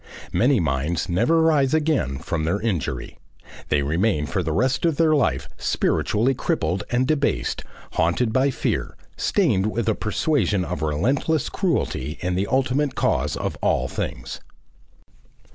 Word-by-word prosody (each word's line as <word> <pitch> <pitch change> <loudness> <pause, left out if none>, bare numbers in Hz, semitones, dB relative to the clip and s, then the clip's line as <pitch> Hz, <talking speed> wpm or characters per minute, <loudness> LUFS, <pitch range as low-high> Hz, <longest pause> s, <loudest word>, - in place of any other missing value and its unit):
Many 130 0 +3
minds 80 +2 -1
never 120 - +3
rise 150 -3 +3
again 150 - +1
from 80 +4 -3
their 85 +6 0
injury. 95 - -3 0.5
They 70 -1 +2
remain 80 +2 +1
for 95 - -1
the 80 -2 -2
rest 130 - +1
of 165 -3 +1
life 145 - +2
spiritually 115 +6 +1
crippled 90 -7 -1
and 125 +1 +1
debased, 145 0 0 0.3
haunted 90 +8 +1
by 130 +2 +3
a - - +1
fear, 120 - -2 0.2
stained 115 - +1
with 115 +2 -2
a 110 - +3
persuasion 105 - 0
of 85 -4 -4
relentless 125 - 0
cruelty 85 - -1
in 90 +1 -1
the 95 +3 0
ultimate 135 +1 +1
cause 70 +1 0
of - - -3
all - - +1
things. - - -5
110 Hz, 145 wpm, -23 LUFS, 85-140 Hz, 0.5 s, Many